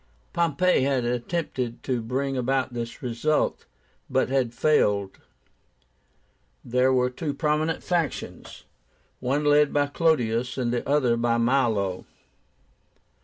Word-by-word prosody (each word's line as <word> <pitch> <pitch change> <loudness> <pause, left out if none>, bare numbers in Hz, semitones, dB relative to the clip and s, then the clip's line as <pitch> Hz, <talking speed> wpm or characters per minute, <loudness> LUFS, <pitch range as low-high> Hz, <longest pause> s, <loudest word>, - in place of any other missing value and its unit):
Pompey 170 0 +2
had 130 -2 +1
attempted 125 0 -3
to 125 -3 -1
bring 135 +4 -2
about 130 0 0
this 115 +1 -6
result, 125 +6 -1 0.4
but - - +1
had 130 -3 +1
failed. 105 -7 +1 1.5
There 125 +2 +2
were 125 -1 +2
two 145 +2 -4
prominent 155 +2 0
factions, 170 -6 -3 0.6
one 140 +4 0
led 145 0 +4
by 145 0 +2
CLODIUS, 125 -6 0
the 120 -2 -1
other 130 -5 +3
by 115 0 +1
MILO. 115 -7 +1
130 Hz, 110 wpm, -25 LUFS, 120-145 Hz, 1.5 s, led